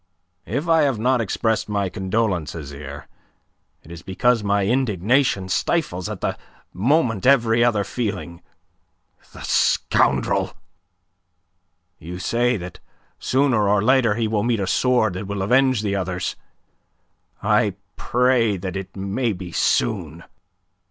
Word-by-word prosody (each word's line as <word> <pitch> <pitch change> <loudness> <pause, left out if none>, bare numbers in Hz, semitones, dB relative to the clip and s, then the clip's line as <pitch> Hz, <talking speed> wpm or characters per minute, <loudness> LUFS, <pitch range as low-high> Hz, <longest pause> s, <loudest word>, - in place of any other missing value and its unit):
"If 140 - -2
I 165 -1 +4
have 140 -5 +1
not 125 +2 +1
expressed 110 +1 -1
my 100 -2 0
condolence, 95 -4 -2
Azyr, 70 -2 -8 0.8
it 80 - -14
is 85 -1 -9
because 115 +4 +1
my 100 -1 +1
indignation 115 -2 +1
stifles 95 - -1
at - - -6
the - - -2 0.3
moment 115 - +1
every 120 -4 +4
other 110 -4 +2
feeling. 100 -5 -4 0.9
The - - -11
scoundrel! 65 -2 +1 1.4
You 90 +2 -7
say 120 +5 0
that 90 -1 -9 0.4
sooner 125 -6 +2
or 100 0 +2
later 125 -3 +3
he 115 -1 0
will 105 -1 0
meet 115 0 0
a 95 - -1
sword 115 0 +2
that 95 +2 -6
will 100 -1 -3
avenge 125 +1 +3
the 100 -1 -1
others. 90 -2 -3 1.1
I - - +2 0.2
pray 120 -4 +2
that 95 +1 -5
it 95 -1 -6
may 100 +5 -1
be 90 -2 -8
soon." 85 -5 0
105 Hz, 130 wpm, -22 LUFS, 95-120 Hz, 1.4 s, I